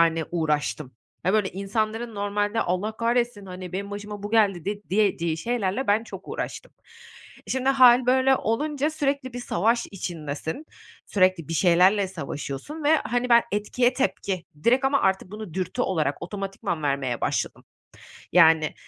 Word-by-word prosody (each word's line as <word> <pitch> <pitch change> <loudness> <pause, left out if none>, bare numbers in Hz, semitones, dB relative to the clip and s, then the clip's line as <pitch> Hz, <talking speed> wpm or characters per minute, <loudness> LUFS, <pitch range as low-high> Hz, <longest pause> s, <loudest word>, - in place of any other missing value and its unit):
yani, 165 -1 +3
uğraştım. 150 -5 -1 0.3
Hani, 185 - +1
böyle 210 -3 +2
insanların 215 +4 -2
normalde, 205 +2 -1
"Allah 190 +5 -1
kahretsin, 235 -3 0
hani, 185 -1 -8
benim 200 +2 -4
başıma 205 0 -7
bu 205 - -5
geldi." 200 -6 +2
de 205 +1 -3
diyeceği 185 -5 +1
şeylerle 230 +4 -1
ben 210 +3 +2
çok - - -10
uğraştım. - - -5 0.8
Şimdi 260 0 0
hâl 255 -2 +6
böyle 260 +1 +4
olunca 290 +6 -1
sürekli 280 -4 -2
bir 245 - -5
savaş 230 +2 +1
içindesin, 160 - -5 0.4
sürekli 185 -5 +2
bir - - -3
şeylerle 185 +4 +4
savaşıyorsun 155 - -6
ve, 315 +2 +5
hani, 245 -3 -1
ben 235 -1 +6
etkiye 240 +5 +1
tepki, 195 -9 -1 0.2
direkt 255 +3 +4
ama 275 +1 +3
artık 190 -1 +1
bunu 210 -5 -8
dürtü 185 -1 -2
olarak, 155 -6 -1
otomatikman 195 -2 -4
vermeye 135 -4 -1
başladım. - - -2 0.7
Yani, 160 -3 +5
205 Hz, 145 wpm, -25 LUFS, 175-240 Hz, 0.8 s, hâl